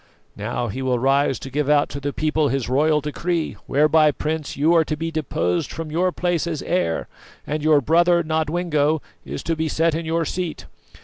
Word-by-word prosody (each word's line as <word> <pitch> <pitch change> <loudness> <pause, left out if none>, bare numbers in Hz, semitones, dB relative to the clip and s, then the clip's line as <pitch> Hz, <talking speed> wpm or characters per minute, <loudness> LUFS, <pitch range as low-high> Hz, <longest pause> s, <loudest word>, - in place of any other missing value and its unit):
"Now 115 +3 -3
he 115 +5 -5
will 130 -1 +1
rise 135 +2 +2
to 135 - -9
give 145 +1 -1
out 145 -1 +4
to 140 - -5
the 140 0 -3
people 155 +1 0
his 135 -2 -1
royal 150 +4 +2
decree, 165 +3 -2
whereby, 155 +2 +4
Prince, 155 0 -3
you 155 +4 +3
are 165 -1 +5
to 155 -1 -3
be 165 +1 -3
deposed 90 - -1
from 160 -2 -6
your 180 +3 +1
place 175 -2 -1
as 160 -4 -3
heir, 170 - -1 0.4
and 150 +1 -2
your 150 -1 +4
brother, 170 +4 +3
Nodwengo, 155 -1 0 0.3
is - - -6
to 165 - -1
be 160 0 -1
set 165 +1 +1
in 165 +1 -3
your 165 0 0
seat. 175 0 -4
155 Hz, 195 wpm, -22 LUFS, 140-165 Hz, 0.4 s, are